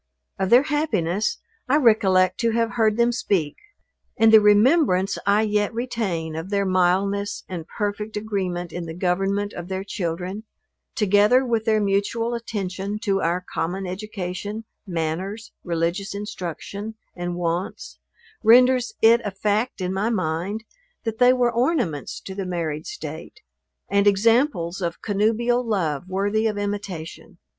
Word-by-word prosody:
Of 190 -1 0
their 245 +4 +7
happiness 215 - 0 0.3
I 275 - +4
recollect 190 -8 +3
to 230 - +2
have 230 0 +1
heard 220 -2 +2
them 235 0 +3
speak; 185 -10 -1 0.6
and 225 0 +5
the 220 - +9
remembrance 210 - +4
I 205 +2 +4
yet 210 -1 +1
retain 200 -10 -2
of 165 +4 -5
their 200 -1 +1
mildness 190 +2 +1
and 170 -3 -6
perfect 210 0 -3
agreement 185 -5 -3
in 175 -1 -5
the 160 - -6
government 195 +3 0
of 175 0 -7
their 190 0 -3
children, 185 +1 -4 0.5
together 210 +5 +4
with 230 -3 0
their 220 -2 +3
mutual 205 +4 0
attention 200 -3 -4
to 195 -2 +1
our 175 +2 -1
common 180 +4 -2
education, 195 +2 -5 0.2
manners, 180 +6 -3
religious 175 +4 -2
instruction 205 +1 -6 0.2
and 175 0 -4
wants, 175 - -3 0.4
renders 250 +2 +5
it 230 +1 +6
a 205 - -2
fact 210 +3 -1
in 185 0 -1
my 200 +4 0
mind, 185 +1 -2 0.4
that 225 -2 -4
they 250 0 +7
were 245 -1 +2
ornaments 235 - 0
to 190 - -8
the 190 -1 -4
married 160 -4 -3
state, 425 0 -8 0.5
and 200 0 +2
examples 205 - +2
of 170 -1 -3
connubial 225 +4 +1
love, 180 - -1
worthy 205 +4 +1
of 210 -2 -2
imitation. 200 -5 -5
200 Hz, 140 wpm, -23 LUFS, 180-225 Hz, 0.6 s, the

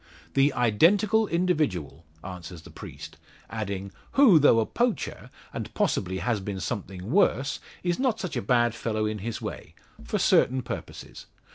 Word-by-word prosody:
"The 140 +1 +4
identical 195 - +3
individual," 155 - -1 0.2
answers 90 -2 -8
the - - -13
priest, - - -10 0.3
adding, 100 -3 -4 0.2
"who, 245 - +7
though 140 -6 +5
a 110 - +2
poacher, 240 - -2 0.2
and - - -5
possibly 95 0 0
has 115 +2 0
been 95 0 -5
something 95 -1 -5
worse, 140 -6 +2 0.2
is 175 -1 0
not 255 -4 +1
such 185 - -4
a - - -1
bad 120 -3 +2
fellow 110 -2 -2
in 105 0 -2
his 115 +3 -5
way - - -7 0.3
for - - -2
certain 130 0 +3
purposes. - - -8
120 Hz, 150 wpm, -26 LUFS, -, 0.3 s, who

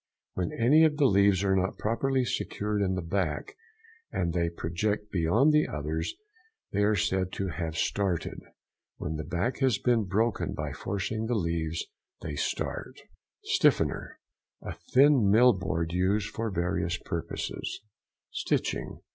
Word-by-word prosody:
—When 90 -2 -2
any 140 +8 +5
of 155 -2 +3
the 145 - +4
leaves 100 -4 +4
are 95 -1 +3
not 95 0 0
properly 130 +4 0
secured 105 -2 -2
in 95 -1 +1
the 90 - -3
back, 100 - -2 0.6
and 85 -2 -1
they 85 -1 +1
project 105 +6 -2
beyond 105 - +3
the 150 0 +4
others, 80 +3 -3 0.6
they 105 - 0
are 105 +1 +3
said 95 -1 0
to 95 -1 -2
have 80 -1 -4
started. 95 -5 -1 0.6
When 80 +1 -4
the 80 - -4
back 90 +10 -2
has 130 -6 +3
been 120 -2 +2
broken 110 +3 0
by 75 -2 -4
forcing 100 +8 -3
the 120 - 0
leaves 85 -4 -1 0.4
they 75 - -4
start. - - -3 0.4
STIFFENER.—A - - -1 0.2
thin 135 -5 +5
mill 120 +4 +6
board 85 -3 -2
used 100 +3 +1
for 115 +1 -3
various 85 -1 -1
purposes. 85 -4 -4 0.5
STITCHING. - - -2
95 Hz, 140 wpm, -28 LUFS, 85-115 Hz, 0.6 s, mill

